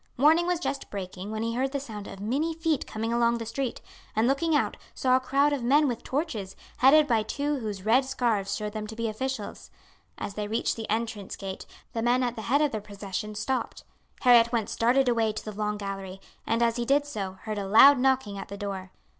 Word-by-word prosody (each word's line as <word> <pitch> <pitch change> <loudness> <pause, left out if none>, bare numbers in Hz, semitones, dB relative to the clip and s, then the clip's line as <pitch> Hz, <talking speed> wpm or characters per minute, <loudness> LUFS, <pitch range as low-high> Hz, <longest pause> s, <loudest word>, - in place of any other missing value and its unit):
Morning 320 +6 +5
was 355 -2 +1
just 280 -5 -3
breaking 190 0 -6
when 220 +1 -3
he 230 0 -1
heard 265 +3 0
the 280 - -2
sound 215 -7 -8
of 195 - -9
many 280 +11 -1
feet 320 -3 -1
coming 225 +2 -3
along 235 0 +2
the 230 - -5
street, 240 +2 -3 0.3
and 220 +2 +3
looking 305 +4 +2
out - - +1 0.2
saw 255 -1 +3
a - - +4
crowd 280 +3 +2
of 280 - -2
men 285 +5 +4
with 240 -3 -3
torches, 255 - -3 0.2
headed 295 +4 +6
by 230 -6 +2
two 285 +6 -2
whose 210 -4 -5
red 240 +5 +4
scarfs 235 -7 0
showed 210 -1 -4
them 215 -1 -4
to 220 - -8
be 230 0 -2
officials. 225 0 -4 0.5
As 205 - -5
they 210 0 -3
reached 225 +2 0
the 225 -1 -6
entrance 220 -3 -2
gate 190 -1 -7 0.3
the 225 - -2
men 245 +2 +2
at 245 -1 -1
the 220 - -5
head 285 +4 +4
of 295 - +1
the 215 - -3
procession 205 +1 -6
stopped. 255 +5 -3 0.4
Harry 245 -2 +8
at 230 0 +1
once 225 -2 -1
darted 250 +3 +3
away 230 -2 +2
to 215 - -7
the 215 - -4
long 210 0 -2
gallery, 195 -2 -6 0.3
and 230 +1 +2
as 230 0 +1
he 240 - 0
did 285 +3 +3
so, 200 -9 -4
heard 215 -2 -3
a 195 - -4
loud 270 +7 +8
knocking 260 -6 +1
at - - -7
the 200 - -7
door. 195 -2 -5
230 Hz, 230 wpm, -27 LUFS, 210-265 Hz, 0.5 s, Harry